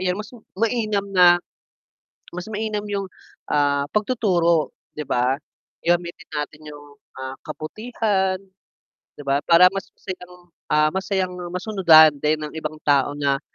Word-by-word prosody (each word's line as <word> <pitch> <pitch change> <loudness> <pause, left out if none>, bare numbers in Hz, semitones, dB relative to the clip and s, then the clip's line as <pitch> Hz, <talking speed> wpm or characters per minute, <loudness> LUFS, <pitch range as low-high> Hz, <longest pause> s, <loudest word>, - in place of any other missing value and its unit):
Ayan 180 0 0
mas 210 +3 -8 0.2
mainam 215 -2 0
na 180 -2 +7 0.9
mas 180 0 -7
mainam 210 -1 -2
yung, 200 -2 -3 0.4
ah, 145 -1 +1
pagtuturo 190 -8 +1 0.2
'di 150 - -6
ba. 125 +1 +2 0.5
Gamitin 175 +1 -1
natin 150 0 -5
yung, 145 -1 -13 0.2
ah, 130 0 -5
kabutihan 190 +4 -2 0.8
'di - - -9
ba 140 +1 +1
para 180 +3 +6
mas 195 0 -5
masayang 180 -1 -8 0.3
ah, 150 0 +3
masayang 190 -1 -1 0.2
masunudan 175 -5 +6
din 150 +1 +2
ang 150 - -7
ibang 155 -1 -5
tao 145 0 +2
na, 140 -1 0
175 Hz, 130 wpm, -22 LUFS, 150-195 Hz, 0.9 s, na